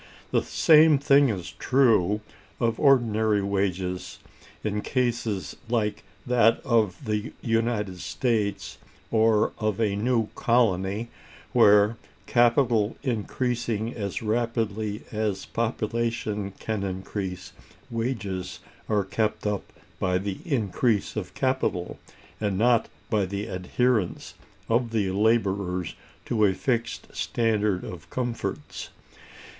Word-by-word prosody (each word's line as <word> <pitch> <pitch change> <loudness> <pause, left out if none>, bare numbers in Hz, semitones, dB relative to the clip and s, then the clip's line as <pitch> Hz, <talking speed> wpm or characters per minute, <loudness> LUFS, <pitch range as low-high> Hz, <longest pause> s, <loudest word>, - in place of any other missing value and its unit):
The - - +3
same 155 -1 +5
thing 140 0 +5
is 90 -5 -4
true 110 -6 +3 0.4
of 115 -1 0
ordinary 110 -7 +3
wages, 95 -2 -2 0.5
in 105 -1 -1
cases 120 -6 -1
like 110 -3 0 0.2
that 115 -2 +4
of 115 -3 +1
the 105 -1 -2
United 115 -5 0
States, 110 -4 -1 0.3
or 110 -1 +3
of 110 -2 -1
a 105 -3 +1
new 115 +1 +1
colony, 110 -2 +1 0.4
where, 105 +2 +5 0.3
capital 120 -3 +3
increasing 120 -2 -1
as 100 -1 -4
rapidly 110 -2 -1
as 105 -3 -2
population 115 -3 -2
can 110 -2 -3
increase, 95 -2 -4 0.4
wages 110 -6 -3 0.3
are 105 -2 +2
kept 105 +3 -1
up 105 -1 -2 0.3
by 90 0 +1
the 95 0 -4
increase 115 - 0
of 95 -4 -5
capital, 130 -9 -1 0.4
and 100 -3 -1
not 120 +1 +3 0.2
by 105 -4 +2
the 100 +2 -3
adherence 105 +2 -1 0.3
of 115 +1 +1
the 105 -4 0
laborers 100 -4 +1 0.3
to 110 -3 +1
a 95 -2 +2
fixed 115 -1 -2
standard 105 -5 0
of 85 -2 -9
comforts. 120 -2 -4
110 Hz, 105 wpm, -26 LUFS, 100-115 Hz, 0.5 s, same